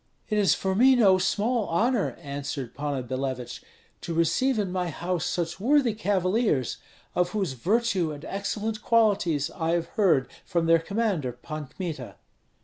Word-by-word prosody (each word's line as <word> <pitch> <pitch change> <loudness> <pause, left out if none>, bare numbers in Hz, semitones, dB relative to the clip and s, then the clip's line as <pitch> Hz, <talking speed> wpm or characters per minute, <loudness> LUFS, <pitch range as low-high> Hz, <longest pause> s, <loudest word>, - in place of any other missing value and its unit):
"It 215 -1 +1
is 200 - +4
for 190 0 -1
me 255 +6 +6
no 195 -6 +5
small 215 +4 0
honor," 225 +5 +1
answered 140 -4 -5
Panna 140 -2 -3
Billevich, 130 0 -4 0.4
"to 165 - -4
receive 225 +11 +2
in 200 -4 -1
my 180 -1 -1
house 175 +1 -2
such 175 +1 -2
worthy 260 +1 +3
cavaliers, 195 - 0 0.4
of 180 0 +1
whose 195 -9 -1
virtue 190 - +1
and 145 -1 -8
excellent 210 +2 -3
qualities 200 -10 +2
I 165 -1 -1
have 170 -1 -1
heard 180 -11 +2 0.2
from 170 -1 0
their 165 0 +5
commander, 195 - -1
Pan 150 +5 -7
Kmita." 155 -7 -6
180 Hz, 150 wpm, -26 LUFS, 155-215 Hz, 0.4 s, me